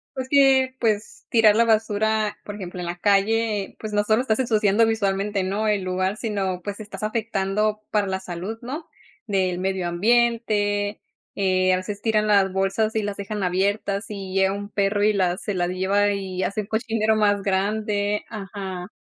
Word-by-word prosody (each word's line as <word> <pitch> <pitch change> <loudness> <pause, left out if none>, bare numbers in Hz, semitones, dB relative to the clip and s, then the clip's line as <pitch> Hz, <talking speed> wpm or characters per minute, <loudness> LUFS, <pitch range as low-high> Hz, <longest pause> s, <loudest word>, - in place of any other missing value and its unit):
Pues, 260 -1 -4
que, 265 -2 +4
pues, 215 -2 -1
tirar 220 -3 +5
la 230 - +5
basura, 220 -1 +1
por 205 - -7
ejemplo, 180 -2 -7
en 175 - -4
la 175 +1 -4
calle, 205 +1 +1
pues, 215 -1 -6
no 205 0 +2
solo 215 +3 +2
estás 240 -2 0
ensuciando 220 -2 +3
visualmente, 200 -2 0
¿no?, 205 +3 -1
el 205 -3 +1
lugar, 185 +2 -1
sino, 195 -5 -2
pues, 205 +1 -5
estás 205 -1 -8
afectando 215 -1 -1
para 205 -2 +1
la 190 0 -2
salud, 185 +4 -6
¿no?, 300 +7 -6 0.4
del 185 -3 0
medio 190 -1 -1
ambiente. 210 0 +1 0.3
Eh, 185 -1 +2
a - - +2
veces, 200 +2 -5
tiran 215 -2 +2
las 200 -2 +3
bolsas 195 +4 0
y 220 - +1
las 205 0 -4
dejan 200 0 -4
abiertas, 200 +2 0
y 195 -2 -6
llega 190 0 +2
un 205 0 -6
perro 205 0 0
y 215 0 +4
las 185 -1 0
se 205 - -2
las 175 -1 0
lleva 195 +3 +1
y 190 -2 -3
hace 200 +3 -1
un 200 - -10
cochinero 220 -1 0
más 205 -2 +2
grande 205 +1 0
ajá 195 -4 -6
205 Hz, 180 wpm, -23 LUFS, 190-215 Hz, 0.4 s, tirar